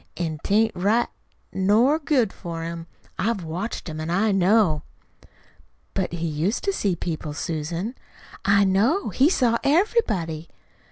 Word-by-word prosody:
An' 160 -3 -3
'tain't 220 +2 +3
right 205 +6 +1 0.4
nor 220 +11 +3
good 270 -9 +1
for 165 -2 -6
him. 165 0 -6 0.3
I've 220 -3 0
watched 175 +9 -4
him 155 -1 -5
an' 160 - -4
I 200 +5 +2
know." 195 -4 +3 1.1
"But 190 -3 -2
he 170 -1 -3
used 165 +7 -1
to 395 - 0
see 200 - 0
people, 160 -3 -4
Susan." 170 +7 -3 0.5
"I 200 +1 +4
know 215 - +2
it. - - -11
He 275 +4 +6
saw 240 -9 +2
everybody." 220 - +1
195 Hz, 145 wpm, -24 LUFS, 165-230 Hz, 1.1 s, He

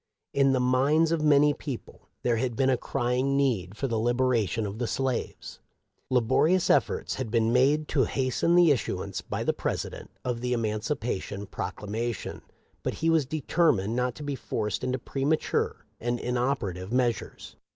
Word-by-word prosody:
In 135 -1 +4
the 130 - +2
minds 140 +6 +3
of 165 -2 +1
many 150 -1 +5
people 140 -4 -8
there 120 -2 +2
had 120 0 -1
been 135 +2 +3
a - - +4
crying 130 +2 0
need 105 -9 0
for 135 - -1
the 115 -3 -1
liberation 120 -3 +1
of 100 +2 -5
the 120 - -1
slaves. 130 -1 -3 0.5
Laborious 130 +9 +3
efforts - - +1
had 130 -4 -4
been 115 0 +2
made 145 +4 +3
to 135 -5 +3
hasten 135 +7 +1
the 175 -3 +6
issuance 120 -7 -2
by - - -4
the - - +1
President - - -4 0.2
of 120 -2 -2
the 125 0 0
Eman 110 -3 -1
cipation 105 -5 -3
Proclamation, 110 +1 -4 0.4
but - - -2
he 165 0 +1
was 160 -5 +2
determined 140 - +1
not 125 0 0
to 150 - -8
be 145 -1 -2
forced 105 -6 -3
into 130 +1 0
premature 140 +5 -1
and 120 +1 -1
inoperative 120 -7 -2
meas 125 -2 +2
ures. - - -11
125 Hz, 165 wpm, -27 LUFS, 115-140 Hz, 0.5 s, the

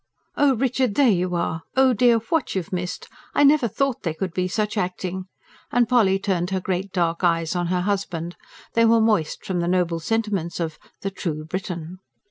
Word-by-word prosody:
"Oh, 280 -2 +4
Richard, 250 -2 0
there 270 -5 +5
you 180 -1 0
are! 165 -1 -1 0.2
Oh 265 -1 +5
dear, 235 +1 +4
what 230 +6 -1
you've 185 -1 -3
missed! 180 0 -4 0.3
I - - +5
never 285 -3 +5
thought 270 +4 -1
there 165 -3 -2
could 185 0 -3
be 185 0 0
such 210 +3 -1
acting." 185 -1 -3 0.5
And 240 -1 +3
Polly 215 -5 +4
turned 185 -2 -1
her 190 0 0
great 185 +1 -3
dark 170 -2 0
eyes 165 -1 +1
on 175 -1 0
her 180 +1 0
husband; 180 -3 -2 0.4
they 230 - +4
were 230 0 +5
moist 215 -8 +1
from 185 -2 -1
the 170 - 0
noble 175 -2 +1
sentiments 200 -3 -1
of 160 -2 -3 0.2
THE 195 - -3
TRUE 155 -5 -4
BRITON. 180 0 -5
185 Hz, 190 wpm, -23 LUFS, 175-225 Hz, 0.5 s, there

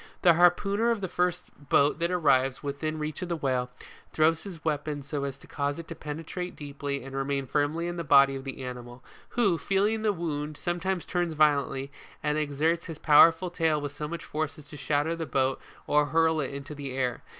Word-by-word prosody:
The 175 - +7
harpooner 195 +6 +3
of 230 -2 +1
the 190 - -3
first 180 0 0 0.3
boat 145 +2 +4
that 170 0 +1
arrives 135 -7 +2
within 150 +2 -3
reach 155 +1 -4
of 180 - -4
the 170 - 0
whale, 130 -5 -1 0.4
throws 160 +1 +3
his 175 -6 -10
weapon 150 -1 -2
so 140 0 -3
as 140 -1 -5
to - - -17
cause 145 0 -2
it 165 -1 -8
to - - -4
penetrate 165 +4 -6
deeply 140 -2 -5
and 135 0 -8
remain 135 0 -1
firmly 150 +6 0
in 175 0 -4
the 170 - -2
body 140 -2 +6
of 135 - -6
the 135 0 -6
animal, 125 0 -8 0.3
who, 200 -9 +3
feeling 205 +3 +1
the 215 -1 +2
wound, 155 -4 -4
sometimes 175 +1 -2
turns 175 -3 -1
violently, 140 -2 +2 0.3
and 150 0 +1
exerts 155 +4 0
his 165 -3 -6
powerful 165 +4 +6
tail 160 -3 +1
with 145 -1 -4
so 150 +1 -5
much 170 +1 -6
force 155 0 -3
as 150 - -12
to - - -10
shatter 150 +3 0
the 165 -1 -4
boat 130 0 0 0.2
or 150 0 +3
hurl 160 +1 +2
it 140 -3 -2
into 140 +2 -7
the 140 -3 -6
air. 125 -3 -1
150 Hz, 205 wpm, -28 LUFS, 140-170 Hz, 0.4 s, The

